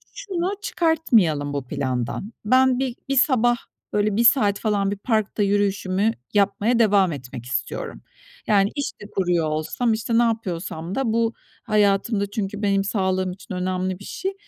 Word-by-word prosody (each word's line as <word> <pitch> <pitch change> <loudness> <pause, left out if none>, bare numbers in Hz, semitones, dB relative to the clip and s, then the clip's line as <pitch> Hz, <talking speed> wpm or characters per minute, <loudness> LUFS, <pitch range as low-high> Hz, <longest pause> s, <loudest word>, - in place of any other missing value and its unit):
şunu 385 -6 -2
çıkartmayalım 225 - +1
bu 135 -3 -4
plandan: 130 - -3
Ben 255 +2 +4
bi 260 -2 -2
bir 275 - +1
sabah, 245 -3 +4 0.4
böyle, 210 -1 +1
1 235 - +2
saat 205 -6 +4
falan 200 -3 0
bir 205 - -3
parkta 215 -1 0
yürüyüşümü 200 +1 +1 0.2
yapmaya 205 +4 +2
devam 200 -5 +4
etmek 125 -3 -7
istiyorum. 125 - -4 0.5
Yani, 200 -1 +3
iş 285 - -2
de - - -8
kuruyor 175 -4 +1
olsam, 155 +10 -1
işte, 230 +1 0
ne 240 - +5
yapıyorsam 180 -6 -3
da 255 -5 0
bu 230 0 +1 0.3
hayatımda 200 0 +1
çünkü 205 0 -3
benim 195 -1 +2
sağlığım 190 -2 0
için 190 +1 -9
önemli 185 0 -2
bir - - -11
şey. 385 +1 -4
205 Hz, 155 wpm, -23 LUFS, 185-230 Hz, 0.5 s, ne